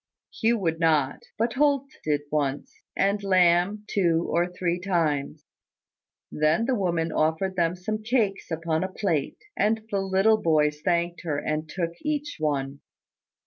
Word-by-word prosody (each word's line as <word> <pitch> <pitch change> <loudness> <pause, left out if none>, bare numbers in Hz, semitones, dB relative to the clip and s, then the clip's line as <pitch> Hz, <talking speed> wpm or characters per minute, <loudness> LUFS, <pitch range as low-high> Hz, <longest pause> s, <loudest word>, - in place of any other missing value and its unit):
Hugh 230 +1 +2
would 165 -5 -1
not: 155 -5 +1
but 230 +2 0
Holt 280 -1 +2 0.2
did 150 -1 0
once; 145 -2 -2 0.2
and 200 +1 +1
Lamb, 185 +1 +3
two 170 -5 +1
or 175 +1 +2
three 180 -1 -2
times. 155 -5 -1 0.9
Then 155 +9 +2
the 260 - +1
woman 170 -6 0
offered 160 +5 0
them 170 -1 +1
some 215 +4 -4
cakes 215 -4 0
upon 160 0 -1
a 190 - -3
plate: 165 -9 -1 0.2
and 220 +1 +1
the 200 - +1
little 195 +3 +3
boys 150 -2 +2
thanked 170 0 0
her, 155 -5 -2
and 155 +1 -2
took 170 -1 -2
each 295 -1 -3
one. 140 -2 -1
175 Hz, 145 wpm, -26 LUFS, 155-200 Hz, 0.9 s, Lamb